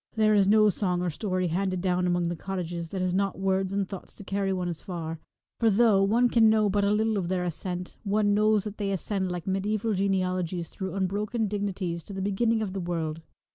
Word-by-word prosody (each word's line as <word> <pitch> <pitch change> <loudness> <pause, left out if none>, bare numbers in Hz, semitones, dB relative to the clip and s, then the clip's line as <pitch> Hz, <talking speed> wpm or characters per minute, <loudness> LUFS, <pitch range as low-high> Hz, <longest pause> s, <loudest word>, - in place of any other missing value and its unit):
There 215 -1 +4
is 200 -2 +4
no 215 +1 +6
song 180 -2 0
or 175 - 0
story 185 +2 -1
handed 185 +2 -1
down 180 0 +1
among 175 0 +1
the 170 0 -1
cottages 175 -2 -4
that 190 +1 -3
has 185 -1 0
not 195 0 0
words 190 0 0
and 200 -1 -1
thoughts 195 -2 -9
to - - -10
carry 195 0 -1
one 180 -2 -1
as 170 -3 -4
far, 165 -4 -5 0.4
for 230 - +4
though 215 -1 +4
one 225 +5 +4
can 230 -2 +5
know 215 -2 +3
but 205 +1 +1
a 200 - +3
little 215 0 +1
of 175 - -3
their 180 0 0
ascent, 180 +1 -4
one 205 0 +2
knows 215 0 +3
that 210 -1 -6
they 200 -1 -1
ascend 190 0 -1
like 180 0 -4
medieval 210 +3 0
genealogies 185 -3 -1
through 190 -1 -5
unbroken 205 +4 -1
dignities 190 -4 -3
to 200 - -8
the 190 - -4
beginning 220 +3 +1
of 190 -3 -4
the 195 - -3
world. 165 -2 -3
195 Hz, 220 wpm, -27 LUFS, 180-205 Hz, 0.4 s, no